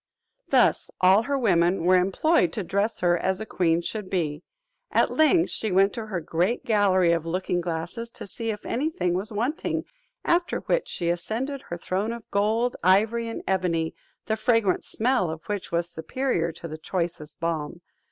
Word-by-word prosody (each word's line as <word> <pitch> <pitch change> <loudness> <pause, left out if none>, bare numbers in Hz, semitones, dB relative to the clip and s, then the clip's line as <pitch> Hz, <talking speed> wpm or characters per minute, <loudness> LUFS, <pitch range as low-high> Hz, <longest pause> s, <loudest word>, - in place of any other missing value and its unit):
Thus - - +3
all 190 +3 +6
her 280 - +2
women 180 -7 +2
were 185 +2 +5
employed 190 - +2
to 210 - -2
dress 200 +5 -1
her 175 -1 +4
as 190 +1 0
a 220 - -4
queen 170 -4 +1
should 205 +2 -5
be. 155 -5 -1 0.5
At - - +2
length, 330 +2 +3
she 220 - -2
went 195 +2 +4
to 225 -2 -5
her 190 -4 -2
great 175 +8 -1
gallery 190 -5 +3
of 165 -1 0
looking 180 +1 -1
glasses, 175 +7 -4
to - - -7
see 225 +4 -5
if 210 -1 -4
any 285 +7 0
thing 250 - -1
was 195 +5 -2
wanting; 240 +9 -1 0.4
after 345 0 +1
which - - 0
she 170 -1 -2
ascended 225 +11 -2
her 175 - -3
throne 190 +6 -2
of 235 -2 -9
gold, 220 +4 +1
ivory, 220 +5 +3
and 230 - -5
ebony, 170 -4 0 0.3
the 220 - 0
fragrant 220 -3 +2
smell 240 -6 0
of 160 0 -7
which 205 -2 -4
was 170 0 0
superior 175 +1 -1
to 170 +1 -9
the 155 0 -7
choicest 170 -3 -4
balm. 165 0 -3
190 Hz, 180 wpm, -25 LUFS, 170-225 Hz, 0.5 s, all